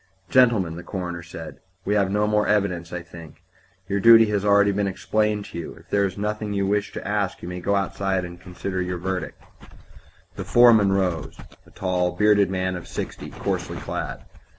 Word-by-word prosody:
"Gentlemen," 110 Hz, -10 st, +3 dB
the -, -, -6 dB
coroner 90 Hz, -2 st, -5 dB
said, 85 Hz, -1 st, -9 dB, 0.3 s
"we 100 Hz, -, +1 dB
have 100 Hz, -2 st, +2 dB
no 105 Hz, +2 st, +1 dB
more 105 Hz, 0 st, +1 dB
evidence, 95 Hz, -5 st, 0 dB
I 90 Hz, -1 st, -5 dB
think. 85 Hz, -3 st, -13 dB, 0.4 s
Your 100 Hz, +1 st, 0 dB
duty 115 Hz, +1 st, +8 dB
has 100 Hz, -1 st, +1 dB
been 105 Hz, -, 0 dB
already 100 Hz, 0 st, +5 dB, 0.2 s
explained 105 Hz, +1 st, -1 dB
to 85 Hz, -, -7 dB
you; 85 Hz, -, -7 dB
if -, -, -19 dB
there 100 Hz, -1 st, +3 dB
is 95 Hz, 0 st, -4 dB
nothing 105 Hz, 0 st, -3 dB
you 100 Hz, -1 st, 0 dB
wish 100 Hz, +1 st, 0 dB
to -, -, -6 dB
ask 105 Hz, -2 st, -2 dB
you -, -, -5 dB
may 90 Hz, 0 st, -5 dB
go 100 Hz, +3 st, 0 dB
outside 95 Hz, -1 st, -1 dB
and 85 Hz, 0 st, -10 dB
consider 95 Hz, +1 st, -4 dB
your 90 Hz, 0 st, -3 dB
verdict." 90 Hz, -1 st, -4 dB, 1.0 s
The -, -, -3 dB
foreman 115 Hz, -5 st, +5 dB
rose 90 Hz, -5 st, -1 dB, 0.3 s
a -, -, -17 dB
tall, 90 Hz, -1 st, -1 dB
bearded 105 Hz, -2 st, +3 dB
man 95 Hz, -1 st, -1 dB
of 90 Hz, -, -8 dB
sixty, -, -, -6 dB
coarsely -, -, -3 dB
clad. -, -, -5 dB
95 Hz, 190 wpm, -23 LUFS, 90-105 Hz, 1.0 s, duty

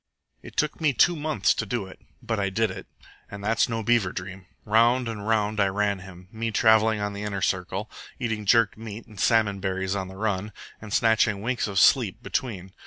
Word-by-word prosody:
"It -, -, -13 dB
took 155 Hz, +2 st, 0 dB
me 150 Hz, -3 st, +3 dB
two 175 Hz, +7 st, +4 dB
months 150 Hz, -9 st, +1 dB
to -, -, -2 dB
do 110 Hz, -1 st, -3 dB
it, 95 Hz, -, -13 dB, 0.2 s
but 115 Hz, -2 st, -2 dB
I 100 Hz, -1 st, 0 dB
did 110 Hz, +1 st, 0 dB
it. 95 Hz, 0 st, -9 dB, 0.4 s
And 100 Hz, 0 st, -8 dB
that's 115 Hz, +3 st, +2 dB
no 115 Hz, -1 st, -2 dB
beaver 115 Hz, -4 st, +2 dB
dream. 95 Hz, 0 st, -8 dB, 0.2 s
Round 115 Hz, +3 st, +3 dB
and 110 Hz, -2 st, -5 dB
round 110 Hz, -1 st, +1 dB
I 100 Hz, -, +4 dB
ran 100 Hz, 0 st, 0 dB
him, 90 Hz, -1 st, -12 dB
me 115 Hz, 0 st, -3 dB
travelling 110 Hz, 0 st, +4 dB
on 105 Hz, 0 st, -2 dB
the 100 Hz, -, -6 dB
inner 100 Hz, -2 st, -3 dB
circle, 95 Hz, +3 st, -1 dB, 0.3 s
eating 110 Hz, -4 st, -3 dB
jerked 115 Hz, -1 st, +4 dB
meat 110 Hz, 0 st, -8 dB
and 105 Hz, -4 st, -14 dB
salmon 105 Hz, -2 st, +2 dB
berries 95 Hz, 0 st, -2 dB
on 95 Hz, -2 st, -3 dB
the 95 Hz, 0 st, -11 dB
run, 105 Hz, -1 st, -2 dB, 0.3 s
and 105 Hz, -1 st, -9 dB
snatching 110 Hz, -2 st, +2 dB
winks 120 Hz, 0 st, -1 dB
of 100 Hz, -1 st, -5 dB
sleep -, -, +4 dB
between. 95 Hz, -7 st, -4 dB
105 Hz, 205 wpm, -25 LUFS, 95-115 Hz, 0.4 s, two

